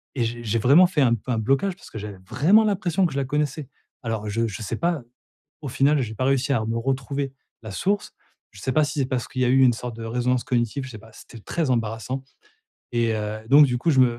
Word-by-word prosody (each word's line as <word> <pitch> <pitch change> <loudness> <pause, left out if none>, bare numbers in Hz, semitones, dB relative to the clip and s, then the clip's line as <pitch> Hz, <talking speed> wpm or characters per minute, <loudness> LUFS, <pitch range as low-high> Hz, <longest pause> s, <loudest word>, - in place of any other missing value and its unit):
je 120 -1 -2
j'ai 115 +1 0
vraiment 145 - +6
fait 160 -5 0
un 120 -3 +4
peu 125 +3 -6
un 115 - 0
blocage 135 - +1
parce - - -15
que - - -7
j'avais 100 -2 -7
vraiment 205 +9 +5
l'impression 190 -3 +1
que 150 - -8
je - - -3
la 135 - -1
connaissais. 145 0 -2 0.4
Alors 110 -2 -3
je 115 +2 0
je 110 +1 -6
sais - - -3
pas, 170 -4 0 0.6
au 140 - -5
final 140 +2 +2
j'ai 110 -2 -4
pas 130 - -1
réussi 135 +1 +1
à 110 -3 0
me 115 +1 -2
retrouver 135 +2 -2 0.3
la 110 - -7
source. 200 - -1 0.4
Je 100 - -14
sais 130 - -1
pas 155 - +4
si 145 - -4
c'est 135 - +2
parce 130 -3 -2
qu'il 130 -1 -3
y - - +3
a - - +2
eu 135 +1 +5
une 120 -2 +5
sorte 120 0 -6
de 115 - -7
résonance 125 +2 0
cognitive, 120 +2 -1
je - - -8
sais 110 - -9
pas, 110 +1 -16
c'était 115 - -13
très 155 +6 -2
embarrassant 115 +3 -2 0.7
et 115 -1 +1
heu, 105 0 -3
donc 145 +2 +8
du 125 -1 -1
coup 165 +7 +1
je 135 - +4
me 120 -2 +3
125 Hz, 255 wpm, -24 LUFS, 115-140 Hz, 0.7 s, donc